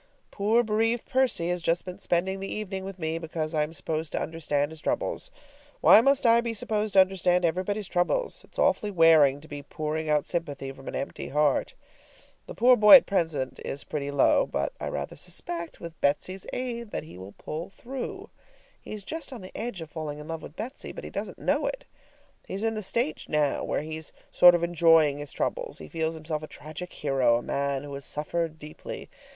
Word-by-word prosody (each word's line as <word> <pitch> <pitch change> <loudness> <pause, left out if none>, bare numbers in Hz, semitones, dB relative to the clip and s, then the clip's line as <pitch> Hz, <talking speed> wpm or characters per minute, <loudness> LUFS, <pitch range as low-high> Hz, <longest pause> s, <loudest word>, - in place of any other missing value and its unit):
Poor 220 +4 +2
bereaved 225 +2 +1
Percy 255 -10 +1
has 180 0 -1
just 165 +1 +1
been 180 +1 -7
spending 190 +1 0
the 195 - -5
evening 195 -3 -4
with 195 -1 -7
me, 160 -1 -2
because 160 -1 -4
I 155 - +2
am 150 +1 -1
supposed 160 0 -3
to - - 0
understand 150 -2 -1
his 160 -1 -10
troubles. - - -2 0.5
Why 215 - +8
must 275 +1 +3
I 230 0 +6
be 235 -1 -3
supposed 215 0 -1
to 195 - +6
understand 180 -1 +2
everybody's 190 +4 -1
troubles? 180 - 0
It's - - -18
awfully 210 - +2
wearing 160 -6 +5
to 160 - -14
be 145 -1 -7
pouring 155 +2 -3
out 150 -1 +2
sympathy 145 -6 -3
from 135 0 -13
an - - -4
empty 135 - -4
heart. 150 -2 +1 0.7
The - - -8
poor 250 +2 +6
boy 210 +2 +10
at 270 - +8
present 160 -9 -1
is 140 - -4
pretty 145 -2 -4
low, 140 -1 +3
but 70 0 -2
I - - -4
rather - - -4
suspect 170 +1 -4
with 170 -1 -9
Betsy's 180 +7 0
aid 235 -3 -4
that - - -4
he 155 - -12
will 95 +2 -10
pull 160 +9 -6
through. 255 +6 -7 0.5
He - - -8
is 210 -2 -7
just 315 +5 -5
on 245 -5 -8
the 185 - -11
edge 225 -6 -4
of 160 -2 -8
falling 155 -2 -5
in 150 0 -9
love 165 -1 -4
with 150 - -11
Betsy, 245 +6 -6
but - - -9
he - - -7
doesn't - - -5
know - - 0
it. - - -4 0.6
He's 195 +3 -4
in 225 0 +1
the 215 - -3
stage 195 -4 -2
now 150 -2 +1
where - - -1
he's 155 0 -6 0.2
sort 175 0 +8
of 170 - -1
enjoying 165 -4 +4
his 145 -2 -5
troubles. - - -3
He 80 - -10
feels 160 - -2
himself 155 -1 -4
a 155 - -7
tragic 155 +5 -8
hero, 130 -5 +2
a 120 - -5
man 140 -1 -1
who 145 -1 -8
has 140 0 -5
suffered 155 +2 -2
deeply. 150 0 -8
165 Hz, 205 wpm, -27 LUFS, 150-205 Hz, 0.7 s, boy